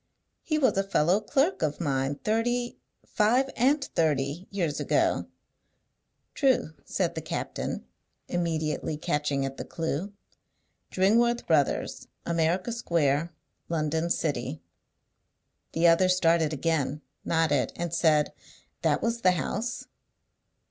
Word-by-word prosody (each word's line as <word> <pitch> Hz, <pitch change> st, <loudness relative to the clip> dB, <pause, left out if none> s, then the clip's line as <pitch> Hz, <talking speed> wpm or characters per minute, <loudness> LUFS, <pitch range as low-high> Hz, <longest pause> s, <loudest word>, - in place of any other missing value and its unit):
"He 310 Hz, -, -1 dB
was 260 Hz, -8 st, +3 dB
a -, -, +2 dB
fellow 190 Hz, -1 st, +2 dB
clerk 275 Hz, -, +1 dB
of 150 Hz, -2 st, -1 dB
mine 135 Hz, -3 st, 0 dB
thirty 240 Hz, +3 st, 0 dB, 0.3 s
five 250 Hz, +5 st, +2 dB
and 275 Hz, +4 st, +3 dB
thirty 150 Hz, -, -1 dB
years 170 Hz, -7 st, -2 dB
ago." -, -, +1 dB, 1.1 s
"True," 260 Hz, -, +2 dB
said -, -, -1 dB
the -, -, -4 dB
captain, -, -, -4 dB, 0.4 s
immediately 160 Hz, -3 st, -1 dB
catching 145 Hz, -2 st, -1 dB
at 135 Hz, 0 st, -5 dB
the -, -, -4 dB
clew: 165 Hz, +4 st, -3 dB, 0.8 s
"Dringworth 235 Hz, +5 st, +2 dB
Brothers, 150 Hz, -4 st, +1 dB, 0.2 s
America 170 Hz, +5 st, 0 dB
Square, 165 Hz, -, +1 dB, 0.4 s
London 160 Hz, 0 st, 0 dB
City." 120 Hz, -, -2 dB, 1.1 s
The 165 Hz, +1 st, +1 dB
other 170 Hz, +2 st, +5 dB
started 165 Hz, -3 st, +3 dB
again, 150 Hz, -1 st, -1 dB, 0.2 s
nodded, 160 Hz, -5 st, +1 dB
and 170 Hz, -1 st, -4 dB
said, 155 Hz, -3 st, +3 dB, 0.5 s
"That -, -, +1 dB
was 235 Hz, 0 st, -1 dB
the 185 Hz, -3 st, +5 dB
house." 220 Hz, +8 st, -3 dB
170 Hz, 115 wpm, -27 LUFS, 150-215 Hz, 1.1 s, other